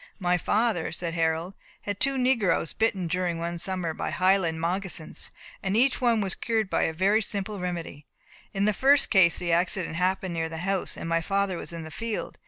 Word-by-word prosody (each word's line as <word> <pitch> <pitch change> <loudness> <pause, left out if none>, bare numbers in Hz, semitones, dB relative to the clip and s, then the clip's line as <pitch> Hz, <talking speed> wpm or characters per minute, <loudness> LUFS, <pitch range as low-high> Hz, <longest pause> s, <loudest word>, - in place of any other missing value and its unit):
"My 180 -2 +1
father," 210 0 +1
said 165 0 -3
Harold, 165 +2 0 0.3
"had 205 -1 -4
two 275 0 +1
negroes 250 -10 +2
bitten 205 -5 0
during 175 0 -1
one 170 +1 -3
summer 180 -2 -2
by - - -3
highland 185 -3 +2
moccasins, 175 -1 -3 0.3
and 195 +2 0
each 260 +3 +3
was 220 -6 +2
cured 220 -4 -1
by - - +2
a - - 0
very 195 +7 +2
simple 205 -1 -3
remedy. 170 -5 -5 0.4
In 200 -1 0
the 210 - +3
first 275 +5 +4
case 185 -5 +5
the 175 -1 -2
accident 175 0 0
happened 185 0 0
near 165 -1 -2
the 160 - -6
house, 195 -1 0
and - - -5
my 165 0 +1
father 195 +1 0
was - - -3
in 165 -1 -6
the 160 - -9
field. 225 +6 -4
185 Hz, 190 wpm, -27 LUFS, 170-205 Hz, 0.4 s, case